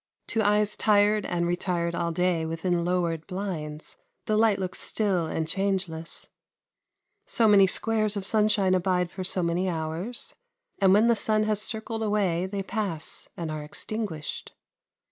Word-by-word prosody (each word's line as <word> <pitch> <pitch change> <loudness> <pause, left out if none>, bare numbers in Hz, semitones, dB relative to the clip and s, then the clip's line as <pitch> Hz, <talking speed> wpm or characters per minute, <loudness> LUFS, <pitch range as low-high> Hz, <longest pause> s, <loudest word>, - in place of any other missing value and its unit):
To 225 - +1
eyes 210 0 +2
tired 210 0 +3
and 170 -1 -1
retired 175 -1 -1
all 170 0 -1
day 180 -1 +1
within 170 +2 -1
lowered 170 -2 -1
blinds, 170 -6 -5 0.3
the 215 - +1
light 220 -1 +4
looks 185 -1 -3
still 190 -6 0
and 160 0 -2
changeless. 185 -3 -2 1.0
So 225 - +3
many 200 -2 +6
squares 215 +1 +2
of 195 - -3
sunshine 210 -2 +3
abide 180 -1 +1
for 190 - -5
so 185 -1 +1
many 175 +2 0
hours, 165 +8 -4 0.5
and 195 -1 +5
when 210 +3 +5
the 235 0 +4
sun 215 0 +1
has 215 -1 +1
circled 220 +1 -2
away 195 -5 0
they 195 0 -4
pass 195 -6 -4
and 165 -2 -4
are 155 -1 -4
extinguished. 160 +1 -5
190 Hz, 150 wpm, -26 LUFS, 170-210 Hz, 1.0 s, many